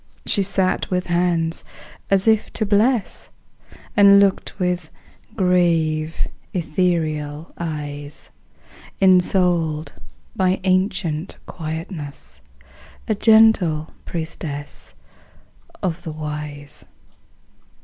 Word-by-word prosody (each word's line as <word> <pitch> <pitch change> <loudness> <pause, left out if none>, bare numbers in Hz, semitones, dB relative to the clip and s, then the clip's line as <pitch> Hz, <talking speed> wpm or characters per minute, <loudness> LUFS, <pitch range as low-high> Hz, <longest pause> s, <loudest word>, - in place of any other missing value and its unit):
She 200 - +3
sat 190 -1 0
with 180 -1 -1
hands 170 -2 0 0.5
as 195 +1 +3
if 220 -1 +3
to 215 - -1
bless, 215 +3 +1 0.7
And 200 -2 +8
looked 200 -1 +1
with 180 -4 -1 0.5
grave, 165 -4 +1 0.3
ethereal 155 -3 -1
eyes; 145 -3 -6 0.7
Ensouled 175 -5 +2 0.4
by 185 0 +1
ancient 185 -3 0
quietness, 155 - -7 0.7
A - - +2
gentle 210 -8 +4 0.2
priestess 160 -3 -6 0.9
of 175 -2 -1
the 160 - -6
Wise. 150 -2 -6
170 Hz, 80 wpm, -21 LUFS, 155-190 Hz, 0.9 s, And